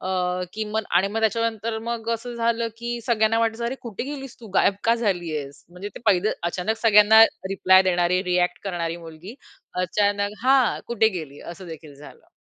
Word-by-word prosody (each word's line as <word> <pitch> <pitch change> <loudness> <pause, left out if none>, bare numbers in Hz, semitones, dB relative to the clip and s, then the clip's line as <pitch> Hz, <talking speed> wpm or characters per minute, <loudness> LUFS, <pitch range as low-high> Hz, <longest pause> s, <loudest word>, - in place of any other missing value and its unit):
अ, - - -6 0.5
की 220 0 -3
मग 220 - +1
आणि 190 +2 +3
मग 225 +2 -3
त्याच्यानंतर 225 0 -1
मग 230 -1 -4
असं 240 +1 -7
झालं, 230 0 0
की 235 0 -4
सगळ्यांना 225 -1 +2
वाटायचं 230 +1 -1
अरे, 245 +3 -2
कुठे 230 -4 -6
गेलीस 270 -3 -8
तू? 225 - -11
गायब 195 - +4
का 230 +1 +4
झाली 180 -8 -1
आहेस? 140 -1 -8
म्हणजे 180 +3 -7
ते - - -9
पहिलं 200 +1 +3 0.2
अचानक 200 +6 -2
सगळ्यांना 220 0 +7 0.3
रिप्लाय 190 -1 +5
देणारी, 180 0 +1
रिएक्ट 180 -1 0
करणारी 170 -3 -3
मुलगी 170 +6 -11 0.5
अचानक 205 +2 0
हां. 265 -2 +3
कुठे 225 -2 +2
गेली? 145 -3 -9
असं 175 +2 -10
देखील 155 -3 -10
झालं. 145 +1 -15
205 Hz, 180 wpm, -23 LUFS, 180-230 Hz, 0.5 s, सगळ्यांना